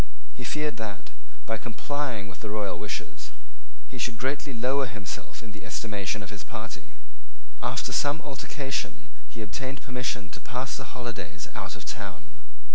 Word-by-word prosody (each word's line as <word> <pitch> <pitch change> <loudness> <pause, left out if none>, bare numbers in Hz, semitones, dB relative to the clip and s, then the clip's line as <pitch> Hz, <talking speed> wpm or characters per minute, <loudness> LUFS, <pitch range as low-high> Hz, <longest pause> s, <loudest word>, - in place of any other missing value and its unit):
He - - -7
feared 150 -4 +2
that, 100 -10 -2 0.3
by 110 0 +2
complying 125 -1 +1
with 95 -1 -7
the 110 - -1
royal 105 -2 +2
wishes, - - -1 0.6
he 120 - -5
should 120 -1 +3
greatly 135 +5 +2
lower 130 +3 +5
himself 105 0 -3
in 110 - -5
the 105 - -7
estimation 105 -2 +1
of 95 - -6
his 100 - -3
party. 115 -2 -4 0.7
After - - +3
some 145 +1 +6
altercation 135 0 0 0.2
he 110 - -3
obtained 130 +5 -1
permission 125 -8 +1
to - - -3
pass 130 +2 0
the 135 -1 -4
holidays 100 -8 -2
out - - -1
of - - -6
town. - - -3
115 Hz, 155 wpm, -32 LUFS, 105-135 Hz, 0.7 s, some